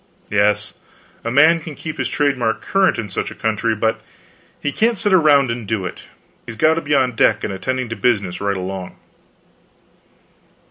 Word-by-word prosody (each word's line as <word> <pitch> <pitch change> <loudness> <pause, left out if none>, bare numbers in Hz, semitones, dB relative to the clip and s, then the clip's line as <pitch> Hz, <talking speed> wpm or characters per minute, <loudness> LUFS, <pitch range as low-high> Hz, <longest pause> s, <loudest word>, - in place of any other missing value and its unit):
Yes, 105 0 +1 0.5
a 115 - -2
man 155 +7 +5
can 155 -2 -9
keep 155 +1 -7
his - - -1
trademark 130 -6 0
current 195 -1 +2
in 115 - -3
such 95 - -3
a - - -10
country, 110 0 -1
but 110 +1 -1 0.6
he 145 - -2
can't 230 +7 +1
sit 205 0 +1
around 145 -7 +5
and 115 -3 -5
do 100 -3 -2
it; 90 - -6 0.5
he - - -5
has - - -10
got 155 +8 +4
to 165 - -2
be 145 -1 0
on 130 -2 +2
deck 115 - +2
and 100 - -2
attending 130 +7 -3
to 115 - -4
business 100 -5 0
right 100 -1 -1
along. 95 0 -6
115 Hz, 185 wpm, -19 LUFS, 105-145 Hz, 0.6 s, man